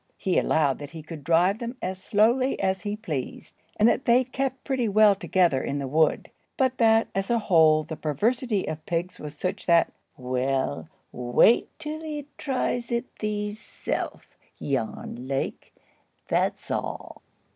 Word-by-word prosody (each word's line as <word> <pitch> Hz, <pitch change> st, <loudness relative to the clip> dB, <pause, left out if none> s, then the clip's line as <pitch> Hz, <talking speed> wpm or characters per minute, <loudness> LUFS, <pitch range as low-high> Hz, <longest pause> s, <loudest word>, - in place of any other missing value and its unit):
He 185 Hz, -, +1 dB
allowed 145 Hz, -4 st, +1 dB
that 145 Hz, -1 st, -7 dB
he 160 Hz, -1 st, -9 dB
could 155 Hz, -1 st, -9 dB
drive 175 Hz, +7 st, +3 dB
them 240 Hz, +1 st, -5 dB
as 185 Hz, -3 st, -4 dB
slowly 235 Hz, +6 st, +2 dB
as 190 Hz, -1 st, 0 dB
he 205 Hz, +2 st, -3 dB
pleased, 160 Hz, -, -5 dB, 0.2 s
and 215 Hz, -, +5 dB
that 245 Hz, -, +2 dB
they 245 Hz, +1 st, +5 dB
kept 265 Hz, +1 st, -3 dB
pretty 260 Hz, -5 st, 0 dB
well 210 Hz, 0 st, +6 dB
together 180 Hz, -7 st, +2 dB
in 140 Hz, -, -2 dB
the 140 Hz, -1 st, -3 dB
wood; 155 Hz, +3 st, +1 dB, 0.3 s
but 260 Hz, -3 st, +1 dB
that, 225 Hz, -1 st, +4 dB
as 195 Hz, 0 st, -2 dB
a 235 Hz, -, +3 dB
whole, 160 Hz, -7 st, +4 dB
the 160 Hz, +1 st, -6 dB
perversity 210 Hz, -, 0 dB
of 155 Hz, 0 st, -5 dB
pigs 175 Hz, +2 st, -2 dB
was 150 Hz, 0 st, -8 dB
such 180 Hz, +4 st, -3 dB
that— 170 Hz, -1 st, +4 dB, 0.2 s
"Well, 125 Hz, -, -1 dB, 0.2 s
wait 125 Hz, -, +3 dB
till 310 Hz, +1 st, -6 dB
ee 300 Hz, -2 st, -5 dB
tries 250 Hz, -3 st, -1 dB
it 235 Hz, +1 st, -2 dB
theeself, 210 Hz, 0 st, -4 dB, 0.4 s
Jan 125 Hz, -1 st, -3 dB
Lake, 135 Hz, 0 st, -3 dB, 0.6 s
that's -, -, -1 dB
aal." -, -, -4 dB
190 Hz, 155 wpm, -26 LUFS, 150-235 Hz, 0.6 s, well